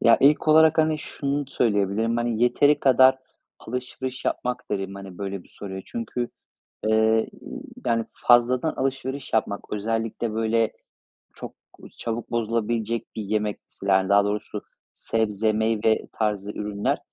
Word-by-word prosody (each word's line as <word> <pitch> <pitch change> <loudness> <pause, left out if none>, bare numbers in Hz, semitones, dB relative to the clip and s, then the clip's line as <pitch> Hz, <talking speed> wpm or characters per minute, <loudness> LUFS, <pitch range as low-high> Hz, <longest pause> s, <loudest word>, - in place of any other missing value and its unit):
Ya, 115 - +6
ilk 150 +3 +4
olarak, 160 +1 +6
hani, 155 -1 +3
şunu 145 -1 -3
söyleyebilirim. 110 -1 +1
Hani, 120 -1 0
"Yeteri 145 +4 +4
kadar 130 0 +6 0.4
alışveriş 125 +2 -5
yapmak." 125 0 -2
derim, 95 -1 -2
hani, 95 -2 -9
böyle 100 -2 -4
bir - - -23
soruya. 95 -1 -7
Çünkü, 125 - -3 0.6
eee, 110 - +3 0.5
ı - - -14 0.4
yani, 115 -1 +1
fazladan 125 +5 +3
alışveriş 135 +1 -3
yapmak 105 -2 -1
özellikle, 115 +1 -2
böyle, 115 0 +1 0.6
çok - - -8 0.4
çabuk 115 +1 -4
bozulabilecek 115 0 -1
bir 110 - -3
yemek, 105 0 -1
mesela, 95 -1 +2
yani, 95 -1 -1
daha 100 0 +5
doğrusu 105 +1 -3 0.3
sebze, 110 -1 0
meyve 110 0 +1
tarzı 105 -2 -1
ürünler 105 -1 -2
115 Hz, 135 wpm, -24 LUFS, 105-125 Hz, 0.6 s, Ya